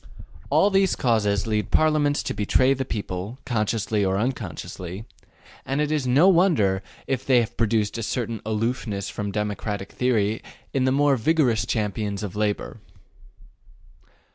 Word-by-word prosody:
All 205 - +4
these 195 -1 +3
causes 105 -5 +1
lead 105 -3 -1
Parliaments 150 -2 +2
to - - -3
betray 130 +6 +3
the 135 0 -3
people, 100 0 -5
consciously 110 -3 0
or 95 0 +1
unconsciously; 100 -4 -4 0.6
and 135 +2 -2
it 150 0 0
is 150 -4 0
no 140 +9 +5
wonder 165 - +3 0.2
if 130 -1 -2
they 130 -2 +4
have 120 0 -2
produced 110 -1 0
a - - -2
certain 115 -1 -3
aloofness 110 -2 -2
from 100 -1 -4
democratic 105 -1 -3
theory 110 -4 0 0.3
in 130 -1 +1
the 130 - +3
more 140 0 +3
vigorous 120 -4 +2
champions 105 -2 -2
of 100 -2 -5
labor. 105 +2 -2
115 Hz, 140 wpm, -24 LUFS, 105-130 Hz, 0.6 s, no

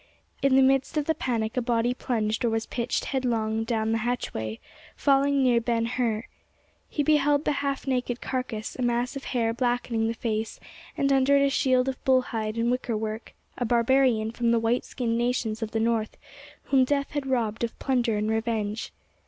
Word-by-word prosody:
In 275 -1 +4
the 265 - +6
midst 270 +3 +2
of 300 - +1
the 320 - +2
panic 230 -5 -2
a 250 - +1
body 235 0 +1
plunged 225 -4 -1
or 235 - +3
was 225 0 -1
pitched 240 0 -2
headlong 225 -4 -1
down 225 -1 -1
the 225 - +1
hatchway, 115 - -3 0.4
falling 280 0 +3
near 240 -2 +4
Ben 230 -1 0
Hur. 230 -2 -1 0.7
He 295 - -1
beheld 295 0 +3
the - - +2
half 275 -1 -2
naked 250 -2 -1
carcass, 250 -4 -4
a - - -5
mass 240 +1 0
of 275 - -6
hair 230 -3 0
blackening 240 -2 0
the 230 - -2
face, 220 -1 -3 0.4
and 275 0 +2
under 270 +1 +4
it 280 - +4
a 275 - +1
shield 255 -1 +2
of 265 -1 -4
bull 260 -1 +4
hide 220 -2 -3
and 235 +1 +1
wicker 250 -3 -1
work—a 220 +3 -6
barbarian 235 -1 +3
from 235 0 0
the 230 0 +3
white 230 +2 0
skinned 230 -2 -2
nations 240 -2 -1
of 225 - -2
the 225 - -2
North 225 -1 0 0.5
whom 270 -2 +3
death 280 +1 0
had 290 -2 -3
robbed 230 -4 -1
of 230 - -3
plunder 245 -5 0
and 210 +1 0
revenge. 220 -1 -2
240 Hz, 190 wpm, -26 LUFS, 225-260 Hz, 0.7 s, the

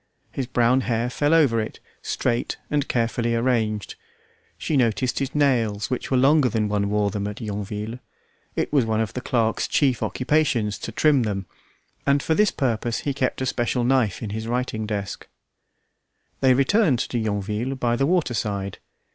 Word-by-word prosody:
His 130 -3 -3
brown 125 +1 +3
hair 120 0 -1
fell 145 +3 +1
over 145 -9 +4
it, 110 - -6 0.2
straight 120 -1 -1
and 145 -1 +1
carefully 115 0 0
arranged. 115 -4 0 0.6
She 155 - -2
noticed 125 -1 +1
his 135 0 -3
nails 120 -8 +1
which 125 - -2
were 130 - +2
longer 140 +1 +4
than 110 -2 0
one 100 -1 0
wore 105 -1 +1
them 100 0 -3
at 105 - -6
Yonville. 105 +1 -5 0.6
It - - -2
was 140 -4 +4
one 110 -1 0
of 110 -2 -1
the 125 - -4
clerk's 115 -3 0
chief 130 -5 +2
occupations 125 -8 0
to 115 - -5
trim 145 +3 +3
them, 100 -4 -2 0.6
and 140 0 +3
for 160 - +1
this 210 +4 +4
purpose 120 -3 -1
he 140 - -1
kept 130 -1 -1
a - - 0
special 120 -1 0
knife 120 -5 +1
in 105 - -4
his 110 +1 -4
writing 120 -3 -2
desk. 100 -2 -4 1.1
They 130 -1 +4
returned 145 - +3
to 120 +1 -2
Yonville 105 +4 -2
by 120 -2 0
the 135 +3 +1
water 170 -7 +1
side. 100 -3 -3
120 Hz, 170 wpm, -23 LUFS, 110-135 Hz, 1.1 s, over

